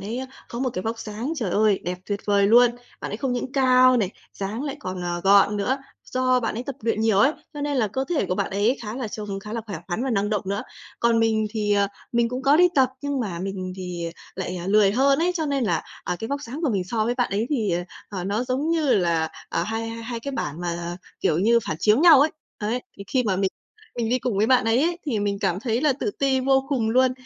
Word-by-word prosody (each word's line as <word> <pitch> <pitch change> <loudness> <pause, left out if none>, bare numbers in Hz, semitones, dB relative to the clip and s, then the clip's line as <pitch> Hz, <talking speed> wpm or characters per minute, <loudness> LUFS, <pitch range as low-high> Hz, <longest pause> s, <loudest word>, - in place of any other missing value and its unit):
ấy 220 +5 -4
á, 260 - -4 0.2
có 235 - -6
một 260 0 0
cái 185 - -3
vóc 225 +2 -3
dáng, 225 +6 -4
trời 225 - -2
ơi, 210 +1 +3
đẹp 180 +1 -3
tuyệt 200 -1 -2
vời 200 -1 +3
luôn. 240 +3 +6 0.3
Bạn - - -5
ấy - - -3
không 255 +2 -2
những 250 +1 -3
cao 255 -1 +5
này, 205 -6 +1 0.2
dáng 205 +5 -4
lại 285 -1 -4
còn, 185 0 -5
ờ, 175 0 -2
gọn 200 +1 +5
nữa, 250 +7 0 0.3
do 255 0 +2
bạn 225 - -2
ấy 235 - -3
tập 275 0 -5
luyện 220 -1 0
nhiều 220 -3 +3
ấy, 265 +8 +5 0.2
cho 295 - -5
nên 290 -1 -1
là 225 -5 +2
cơ 265 +7 -2
thể 325 - 0
của 180 - -1
bạn - - -1
ấy 205 +7 +1
khá 215 0 -5
là 250 -4 -3
trông 205 -2 -5
khá 210 +2 -8
là 230 - -2
khỏe 200 - -5
khoắn 185 +8 -2
và 265 - -1
năng 205 -2 0
động 210 -3 0
nữa. 200 +2 -2 0.4
Còn 235 -1 +3
mình 220 -1 +2
thì, 210 -1 0
ờ, 200 0 +3 0.3
mình 235 -1 +2
cũng 250 +2 -4
có 280 +2 +5
đi 360 +2 +6
tập, 265 -3 +5
nhưng 285 -2 -1
mà 190 -7 -3
mình 185 0 -4
thì 175 -2 -4 0.2
lại, 185 -1 -4
ờ, 175 0 -5
lười 200 0 +4
hơn 275 +4 +3
ấy, 350 +2 +2
cho 320 -3 -1
nên 280 -3 0
là, 170 -7 0 0.2
à, 180 - -2
cái 225 - -5
vóc 280 +1 -3
dáng 265 +5 -6
của 310 - +2
mình 195 -4 0
so 215 +3 -1
với 240 +2 0
bạn 245 -1 0
ấy 205 +4 0
thì, 225 -9 +1
ờ, 175 +1 0 0.3
ờ, 185 -3 -5
nó 205 +5 -1
giống 260 +5 -1
như 315 -5 +2
là, 170 -4 +1 0.2
ờ, - - -1
hai 225 +1 -3
hai 230 +1 -5
cái 280 +4 -5
bản 160 - -3
mà, 175 0 -3 0.2
kiểu 155 - +2
như, 230 +5 +4
phản 155 - -1
chiếu 210 +5 +4
nhau 325 -5 +8
ấy. 300 +3 +4 0.3
Đấy, 220 +4 -1 0.2
thì 200 - -8
khi 255 +4 +1
mà 200 -5 0
mình 195 0 +1 0.5
mình 235 -2 -1
đi 250 +2 +2
cùng 245 -4 -2
với 210 - +3
bạn 255 -1 +4
ấy 225 +4 +3
ấy, 345 +2 0
thì 240 -7 0
mình 205 -1 -1
cảm 180 -1 0
thấy 230 0 0
là 295 -1 +3
tự 290 - -2
ti 275 -7 +1
vô 270 +1 +2
cùng 240 -6 0
luôn. 255 +2 +4
225 Hz, 270 wpm, -24 LUFS, 200-260 Hz, 0.5 s, nhau